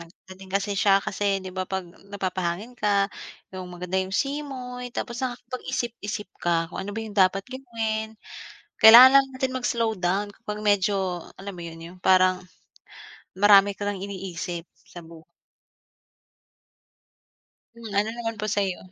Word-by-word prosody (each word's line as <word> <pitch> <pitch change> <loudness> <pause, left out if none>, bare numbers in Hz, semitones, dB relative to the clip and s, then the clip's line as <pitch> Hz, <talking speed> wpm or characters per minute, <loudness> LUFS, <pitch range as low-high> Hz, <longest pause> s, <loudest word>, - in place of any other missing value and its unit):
nag 170 - -11 0.2
pwede 190 0 -13
kasi 200 +2 -1
siya 195 0 +3
kasi 200 -1 0
'di 185 - -7
ba 185 0 -4
'pag 190 -1 -3 0.2
napapahangin 190 +2 -3
ka, 200 -1 +2 0.4
'yong 185 -1 -7
maganda 180 +1 -2
'yong 190 +1 -3
simoy 260 -3 -4
tapos 235 0 -5
nakapag-isip-isip 240 -5 -4
ka 170 -1 +1
kung - - -4
ano 205 +2 -6
ba - - -1
'yong 215 - -8
dapat 190 +1 +3
gawin. 225 -4 -4 0.6
Kailangan 240 +4 +11
lang 275 - +1
natin 260 0 -1
mag-slow 235 -2 0
down 195 +3 0
kapag 210 +1 -7
medyo, 205 -1 +2 0.4
alam 200 +1 -8
mo 180 - -11
'yon, 165 0 -10
'yong 175 +2 -11
parang 185 0 +4 1.0
marami 200 0 +6
ka 205 - -4
nang 205 -2 -3
iniisip 180 -3 -5 0.2
sa 175 -2 -11
bu 165 -1 -13 2.5
Hmm, 235 -1 -10
ano 210 +2 +1
naman 230 -1 -4
po 215 -1 -3
sa'yo? 190 -3 -2
200 Hz, 145 wpm, -25 LUFS, 185-225 Hz, 2.5 s, Kailangan